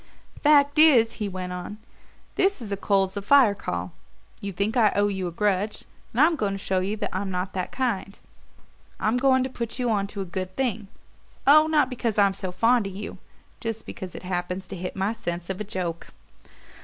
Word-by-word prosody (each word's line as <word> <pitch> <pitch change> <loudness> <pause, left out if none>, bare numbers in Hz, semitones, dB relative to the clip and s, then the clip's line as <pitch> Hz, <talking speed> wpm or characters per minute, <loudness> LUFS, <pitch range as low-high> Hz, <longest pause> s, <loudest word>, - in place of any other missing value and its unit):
"Fact 290 0 +4
is," 250 -8 +6
he 205 - -1
went 185 -1 -5
on, 180 +3 -6 0.6
"this 390 -2 +2
is 220 -4 -7
a - - +1
coals 195 -1 +1
of 200 - -4
fire 255 -2 +6
call. 90 - -4 0.5
You 200 - -4
think 200 +5 -1
I 220 -4 +5
owe 205 +1 +3
you 190 -2 -2
a - - -4
grudge, 205 +3 -1 0.3
and 235 - -3
I'm 325 +2 +5
going 205 -9 -1
to - - -3
show 190 -1 -1
you 200 +4 -2 0.2
I'm 190 +1 -2
not 185 0 -3
that 185 -1 -3
kind. 230 -6 -2 0.8
I'm 220 +3 +1
going 260 0 +3
to 260 - -3
put 235 -2 -5
you 245 -2 0
onto 200 -1 -2
a 195 - -2
good 185 +1 -5
thing 225 -6 -1 0.6
oh, 305 +3 +7
not 300 -4 +3
because 240 -4 -2
I'm 200 -1 +4
so 190 -1 -4
fond 225 +4 +2
of 195 - -8
you; 205 +1 -7 0.4
just 225 -2 -4
because 185 -4 -8
it - - -8
happens 180 +1 -3
to 195 - -5
hit 180 0 -5
my 195 +3 0
sense 175 -5 -4
of 190 - -5
a - - 0
joke." 180 -5 -4
200 Hz, 205 wpm, -25 LUFS, 185-235 Hz, 0.8 s, oh